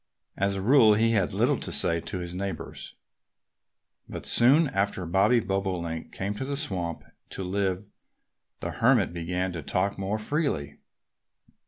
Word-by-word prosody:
As 100 0 0
a 95 - -3
rule 115 -3 +6
he 115 +2 +3
had 100 -5 +1
little - - +1
to - - -4
say 85 0 +2
to 95 - -4
his 90 -1 -5
neighbors. 95 +1 -5 1.1
But - - -7
soon 140 +7 +5
after 95 -4 -1
Bobby 95 +8 +3
Bobolink 95 -5 -3
came 100 +2 -3
to - - -3
the 140 +1 -3
swamp 90 - -3 0.3
to 95 - -5
live 95 +1 -1 0.8
the - - -3
Hermit 115 -7 +3
began 90 +2 -2
to 85 - -5
talk 95 +7 -1
more 100 +2 -1
freely. 105 - -2
95 Hz, 150 wpm, -27 LUFS, 90-110 Hz, 1.1 s, rule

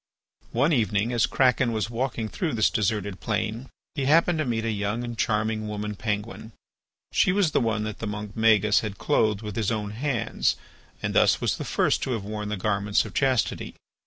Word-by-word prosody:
One 140 +7 +2
evening 110 -1 +1
as 115 -2 +3
Kraken 125 -2 +2
was 110 +1 -2
walking 120 -2 -2
through 160 - -3
this 110 - +3
deserted 105 -3 -1
plain 110 +3 -2 0.2
he 140 -4 -2
happened 165 +3 +4
to 155 - 0
meet 115 -2 -1
a 115 - 0
young 105 +3 -2
and 120 -1 -5
charming 110 -1 0
woman 105 0 -4
Penguin. 110 +1 -4 0.6
She - - +3
was 190 -4 +2
the - - +2
one 110 -2 0
that 110 -1 -5
the 115 - -4
monk 105 0 -5
Magis 110 -2 +4
had 105 -3 -5
clothed 110 0 +1
with 105 -1 -6
his 110 -3 0
own 105 -2 -2
hands 125 +1 0 0.5
and - - -1
thus - - +4
was - - 0
the - - -5
first - - +1
to 130 - -1
have 110 -4 -3
worn 105 0 -4
the 105 - -2
garments 100 +1 +1
of 105 - -9
chastity. 130 -4 0
110 Hz, 195 wpm, -26 LUFS, 105-120 Hz, 0.6 s, happened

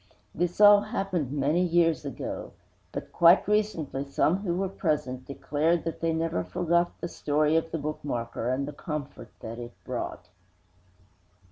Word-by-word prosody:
This 175 +2 -2
all 205 -1 +9
happened 195 - -2
many 145 +4 +1
years 165 -3 +2
ago; 140 - -5 0.4
but - - -7
quite 170 +3 +6
recently 205 -10 0
some 145 +5 +1
who 190 -4 -2
were 190 +2 0
present 150 -9 -2
declared 155 +4 0
that 165 - -5
they 165 0 +1
never 160 - -1
forgot 170 - 0
the - - -2
story 150 -1 +1
of 165 0 +1
the 165 - -2
bookmarker 125 -6 -3
and 140 +2 -1
the 150 - -6
comfort 145 -5 -6
that 115 +2 -7
it 120 0 -8
brought. - - -5
160 Hz, 150 wpm, -27 LUFS, 140-175 Hz, 0.4 s, all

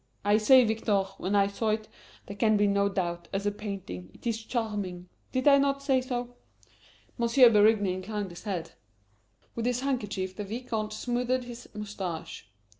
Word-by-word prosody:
I 205 +1 +4
said, 250 +2 +6
Victor, 215 -2 +1 0.2
when 190 +3 -1
I 200 -1 +5
saw 200 +3 -2
it, 215 0 -1 0.4
there 200 - -8
can 215 +1 +3
be 205 - +3
no 200 0 +2
doubt, 175 -3 -3
as 200 +1 -2
a 205 - +2
painting, 195 - -7
it - - -18
is 225 -1 -1
charming 205 -7 -3 0.2
did 255 +2 0
I 280 -1 +7
not 275 0 +1
say 265 -2 +3
so?" 245 -1 -4 0.8
M. 235 - +2 0.3
Berigny 210 -2 +4
inclined 195 +1 -4
his 175 - -10
head. 185 -5 -3 0.8
With 235 0 -2
his 250 0 0
handkerchief 205 -8 -2
the 210 - -4
Vicomte 220 0 -4
smoothed 250 +2 -1
his 245 0 -10
moustache. 190 - -6
210 Hz, 170 wpm, -28 LUFS, 195-240 Hz, 0.8 s, I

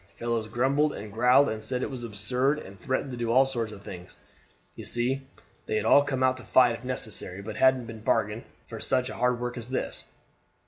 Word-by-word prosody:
Fellows 115 -2 -2
grumbled 140 +6 +2
and 105 -1 -8
growled 125 +5 +5
and 110 0 -4
said 125 +3 -2
it - - -3
was 125 -2 -6
absurd, 125 +6 0
and 100 -9 -10
threatened 130 +4 -2
to 125 - -5
do 120 -1 -1
all 130 +3 +6
sorts 120 -5 -2
of 100 -1 -11
things. 90 -2 -10 0.6
You - - -9
see, 130 +3 -1 0.4
they - - -1
had 110 0 0
all 140 - +7
come 135 -2 -1
out 130 0 +3
to 130 - -8
fight 120 +1 +5
if 115 - -12
necessary, 110 -6 -5
but 105 0 -6
hadn't 120 -4 +2
bargained 110 0 0 0.2
for - - -8
such 130 0 0
hard 125 0 +1
work 125 0 -4
as 120 +1 -7
this. 130 - -3
120 Hz, 210 wpm, -27 LUFS, 110-130 Hz, 0.6 s, all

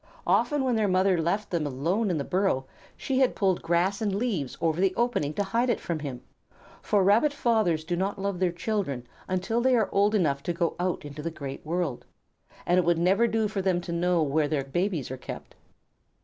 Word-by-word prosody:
Often 295 -3 +2
when 255 -2 +1
their 215 -2 +2
mother 185 -2 +2
left 200 +6 -1
them 165 -4 0
alone 170 - 0
in 175 - 0
the 140 - -1
burrow 180 -6 0 0.3
she 265 -1 -1
had 260 -2 +3
pulled 190 -3 +1
grass 175 +5 +1
and 205 -3 0
leaves 200 - -2
over 165 +1 0
the 190 -1 +2
opening 235 -12 0
to 205 - +1
hide 230 +6 0
it 235 - +1
from 170 -2 -3
him, 135 -4 -6 0.6
for 205 -2 +2
Rabbit 215 +10 +4
fathers 220 - +1
do 175 +2 -2
not 195 +3 -1
love 200 -2 -2
their 185 -2 +2
children 170 - -2 0.2
until 190 +5 0
they 260 +1 +4
are 220 -4 +2
old 205 +2 +3
enough 145 -8 +1
to 175 - -2
go 170 -1 -1
out 180 -3 -1
into 145 +1 -7
the 165 - -3
great 140 -4 -7
world, 165 -5 -2 0.6
and 175 +1 +3
it - - +2
would 170 0 +2
never 190 +7 +3
do 220 -1 +1
for 200 -1 -3
them 185 -2 +1
to 170 - -6
know 170 0 +2
where 150 +1 +1
their 145 -2 -1
babies 170 0 -2
are 130 - -4
kept. - - -8
180 Hz, 215 wpm, -27 LUFS, 160-205 Hz, 0.6 s, Rabbit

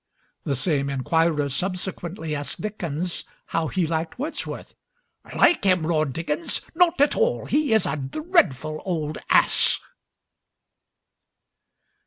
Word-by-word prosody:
The 140 - 0
same 140 -1 0
inquirer 150 +2 +1
subsequently 175 +1 -3
asked 145 0 -4
Dickens 180 -5 -4 0.2
how 165 -1 -1
he 180 +2 0
liked 160 0 -2
Wordsworth. 300 +6 -5 0.6
"Like 345 - +4
him!" 185 -4 +3
roared 155 -3 +1
Dickens, 165 +1 -2
"not 345 -1 +3
at 285 - +4
all; 480 +1 +1
he 295 -3 +1
is 220 -3 +4
a - - -1
dreadful 155 - 0
Old 155 -5 -3
Ass!" - - +4
165 Hz, 115 wpm, -24 LUFS, 150-205 Hz, 0.6 s, Like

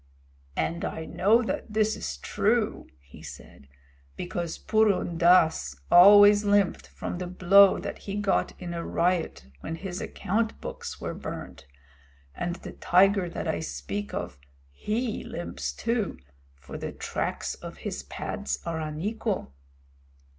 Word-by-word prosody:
"And 170 +1 -1
I 160 - -4
know 220 +9 +3
that 225 - -4
this 215 0 +2
is 70 -2 -5
true," - - 0
he 70 +1 -15
said, 70 - -12 0.5
"because 175 -2 -4
Purun 210 -6 +1
Dass 160 - +4 0.2
always 205 +3 +8
limped 205 -2 +2
from 175 - -6
the 180 - -4
blow 185 +2 +6
that - - -6
he 200 - -6
got 205 -1 0
in 175 -1 -5
a 170 0 -4
riot 170 - 0
when 165 - -5
his 185 +1 -6
account 220 +4 -2
books - - -7
were - - -4
burned, 70 - -8 0.7
and 175 - -3
the - - -9
tiger 190 0 +3
that - - -5
I 85 - 0
speak 80 +7 -5
of 65 - -5 0.3
he 220 - -2
limps, 175 - -5
too, 230 -3 -2 0.4
for 65 -1 -9
the - - -4
tracks - - -3
of - - -10
his - - -3
pads 65 0 -4
are 165 -1 -2
unequal." 180 - -3
180 Hz, 140 wpm, -27 LUFS, 160-205 Hz, 0.7 s, always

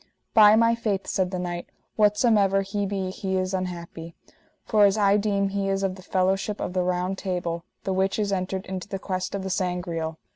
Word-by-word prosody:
By 210 -1 +8
my 230 +1 +4
faith, 215 -4 -2
said 185 -2 0
the 185 - -3
knight, 175 -1 -4 0.3
whatsomever 210 -2 +3
he 200 +1 -2
be 190 -2 -2
he 190 0 -2
is 185 0 -1
unhappy, 170 -3 -5 0.5
for 210 -2 +4
as 200 +1 +3
I 200 -1 +4
deem 200 -1 0
he 195 0 -1
is 195 0 0
of 190 -1 0
the 185 - -12
fellowship 195 +2 0
of - - -3
the 185 - +1
Round 180 +1 -1
Table, 175 -3 -3 0.2
the 190 - -1
which 190 +1 +1
is 205 -2 0
entered 190 0 -2
into 185 0 -5
the 195 - -4
quest 185 0 -3
of 195 - -3
the 190 - -3
Sangreal. 175 -3 -2
190 Hz, 205 wpm, -25 LUFS, 185-200 Hz, 0.5 s, By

